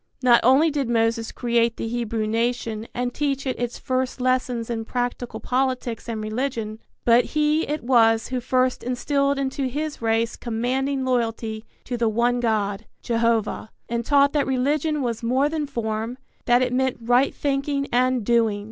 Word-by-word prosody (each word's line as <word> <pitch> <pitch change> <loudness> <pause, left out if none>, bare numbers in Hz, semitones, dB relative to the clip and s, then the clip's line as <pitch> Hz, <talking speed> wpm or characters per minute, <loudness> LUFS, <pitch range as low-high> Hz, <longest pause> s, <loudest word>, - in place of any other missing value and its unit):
Not 240 -2 +6
only 275 +6 +5
did 280 -4 -1
Moses 225 0 +1
create 235 -1 +1
the - - -3
Hebrew 230 -2 -2
nation 230 0 -1
and 245 0 -2
teach 275 -1 -1
it 260 - -2
its 245 0 -3
first 260 -1 -2
lessons 250 -2 0
in 230 -2 -3
practical 245 -1 -3
politics 255 -2 -1
and 225 -1 -3
religion, 220 -1 -3 0.3
but 235 +1 +6
he 305 +1 +2
it 300 -2 -3
was 225 -3 +3
who 255 -1 -1
first 255 +1 +1
instilled 275 +3 0
into 270 0 -1
his 295 +3 -4
race 225 0 +1
commanding 260 +4 -1
loyalty 225 -3 -1 0.2
to 245 - -4
the 230 -1 +2
one 240 +3 +1
God, 215 -3 -1 0.2
Jehovah, 230 -2 0 0.2
and 235 0 -2
taught 280 +2 +4
that 295 -2 +1
religion 290 +3 0
was 235 -3 -2
more 255 +4 +2
than 305 -2 -2
form: 230 -2 -3 0.3
that 245 +1 +4
it 250 -1 -1
meant 260 0 +1
right 245 +4 +3
thinking 275 0 -1
and 255 -1 +2
doing. 225 -3 +2
245 Hz, 165 wpm, -23 LUFS, 230-265 Hz, 0.3 s, Not